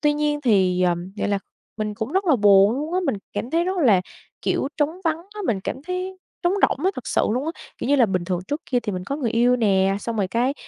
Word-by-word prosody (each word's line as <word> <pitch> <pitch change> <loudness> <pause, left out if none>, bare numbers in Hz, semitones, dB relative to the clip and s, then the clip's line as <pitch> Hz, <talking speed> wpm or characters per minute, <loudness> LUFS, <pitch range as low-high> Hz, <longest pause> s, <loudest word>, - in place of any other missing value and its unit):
Tuy 295 -1 +3
nhiên 295 0 0
thì, 190 -7 +3
ờm, 175 +1 0
gọi 210 - -1
là, 200 - +1 0.4
mình 215 -1 -3
cũng 220 +6 -4
rất 385 +1 +1
là 305 -7 +4
buồn 200 -1 +6
luôn 305 +4 -4
á, 370 - +2
mình - - 0 0.2
cảm 245 - -4
thấy 335 +3 +2
rất 375 +1 -1
là, 220 - +5 0.4
kiểu, 275 - 0
trống 315 +4 -1
vắng 320 -1 +2 0.2
á, 420 - -6
mình 200 -4 0
cảm 265 - -5
thấy 365 +2 -4 0.2
trống 350 +1 +2
rỗng 295 - +2
á 380 - +4
thật 255 - -7
sự - - +1
luôn 250 +5 -1
á. - - 0 0.3
Kiểu - - -3
như 285 - +4
là, 240 -4 +5
bình 185 -3 -1
thường 180 -1 -1
trước 290 +2 -2
kia 245 -2 +2
thì 210 - -4
mình 180 -1 -4
có 275 - -3
người 250 -7 -1
yêu 245 +2 +3
nè, 195 -3 +2
xong 230 +1 -4
rồi 195 -3 0
cái, 245 +7 0
240 Hz, 270 wpm, -23 LUFS, 200-300 Hz, 0.4 s, buồn